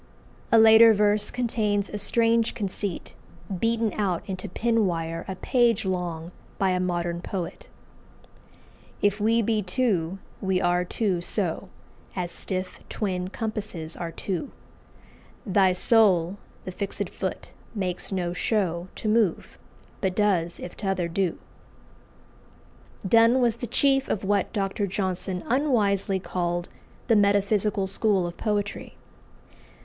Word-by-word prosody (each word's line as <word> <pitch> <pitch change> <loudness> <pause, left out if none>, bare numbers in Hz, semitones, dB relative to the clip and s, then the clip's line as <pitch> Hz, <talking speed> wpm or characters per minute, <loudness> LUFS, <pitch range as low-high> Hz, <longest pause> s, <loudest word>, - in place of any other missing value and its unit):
'" - - -28
A 230 - +6
later 225 0 +8
verse 210 0 +2
contains 215 -4 0
a 210 - -5
strange 230 +2 +2
conceit, 200 -3 -4 0.5
beaten 230 0 +1
out 190 -4 -1
into 185 -2 -5
pin 225 +2 +1
wire 165 -1 -3
a 190 - -4
page 230 0 +2
long 175 -3 -3 0.3
by 195 -1 +2
a 180 - +1
modern 175 -1 -1
poet 180 -2 -5 1.4
"If 205 0 +2
we 225 +2 +3
be 215 0 +1
two, 190 -4 0 0.2
we 190 -1 +1
are 175 0 +2
two 185 -1 -1
so 185 0 -2 0.5
As 180 -2 -2
stiff 185 -1 -4
twin 185 -4 -2
compasses 205 -6 -5
are 170 -1 -5
two; 190 - -4 1.0
Thy 195 -2 +4
soul, 185 -2 +3 0.3
the 185 - -4
fix'd 200 +2 -4
foot, - - -5 0.2
makes 185 -2 -3
no 175 -2 -1
show 180 -3 -1
To - - -5
move, 215 -5 +1 0.5
but 190 -2 0
does 185 -5 +1
if 175 - -8
t'other 190 -4 -1
do." 180 0 -1 1.7
Donne 230 +4 +5
was 235 -2 +2
the 245 - -5
chief 270 +3 +2
of 200 - -1
what 200 -1 +1
Dr. 200 -1 -1
Johnson 185 -1 -2
unwisely 210 -8 +1
called 175 -1 -2 0.4
"the 230 - +3
metaphysical 205 0 +2
school 195 -1 +1
of 175 0 -5
poetry." 205 -2 -3
195 Hz, 130 wpm, -26 LUFS, 180-220 Hz, 1.7 s, later